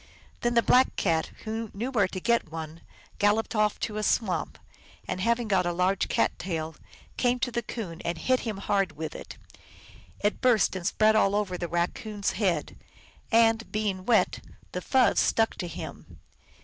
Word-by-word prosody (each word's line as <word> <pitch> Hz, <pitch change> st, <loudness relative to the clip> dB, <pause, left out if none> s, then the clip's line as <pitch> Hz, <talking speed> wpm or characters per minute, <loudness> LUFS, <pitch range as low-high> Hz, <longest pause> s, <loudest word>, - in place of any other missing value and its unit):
Then 240 Hz, 0 st, 0 dB
the 235 Hz, -, +5 dB
Black 255 Hz, +1 st, +4 dB
Cat, 165 Hz, -4 st, +1 dB, 0.2 s
who 225 Hz, 0 st, -4 dB
knew 235 Hz, +6 st, -3 dB
where 205 Hz, -7 st, +3 dB
to 185 Hz, -, -5 dB
get 235 Hz, -5 st, +1 dB
one, 160 Hz, 0 st, -7 dB, 0.4 s
galloped 205 Hz, +3 st, +2 dB
off 215 Hz, -1 st, +1 dB
to 215 Hz, -2 st, -2 dB
a -, -, -1 dB
swamp, 185 Hz, -7 st, 0 dB, 0.5 s
and, 185 Hz, -, -3 dB
having 235 Hz, +2 st, +1 dB
got 190 Hz, -3 st, +2 dB
a -, -, +1 dB
large 185 Hz, +2 st, +1 dB
cat -, -, +2 dB
tail, 160 Hz, -3 st, -3 dB, 0.4 s
came 245 Hz, 0 st, +2 dB
to 245 Hz, 0 st, -1 dB
the 235 Hz, 0 st, -1 dB
Coon 195 Hz, -7 st, -6 dB
and 170 Hz, 0 st, -2 dB
hit 255 Hz, +8 st, +1 dB
him 220 Hz, -4 st, -4 dB
hard 195 Hz, -1 st, 0 dB
with 160 Hz, +1 st, -5 dB
it. -, -, -9 dB, 0.8 s
It 205 Hz, 0 st, 0 dB
burst 240 Hz, -7 st, +3 dB
and 180 Hz, -1 st, -2 dB
spread 215 Hz, +1 st, +3 dB
all 200 Hz, -2 st, +3 dB
over 205 Hz, -3 st, -1 dB
the 175 Hz, -1 st, -3 dB
Raccoon 200 Hz, +5 st, -2 dB
s -, -, +3 dB
head, 190 Hz, -5 st, -1 dB, 0.5 s
and, 225 Hz, 0 st, +3 dB
being 205 Hz, -3 st, -1 dB
wet, 230 Hz, -3 st, +3 dB, 0.3 s
the -, -, -4 dB
fuzz 260 Hz, -2 st, +3 dB
stuck 225 Hz, 0 st, +2 dB
to 180 Hz, -, -4 dB
him. 170 Hz, -, -9 dB
210 Hz, 180 wpm, -27 LUFS, 180-230 Hz, 0.8 s, the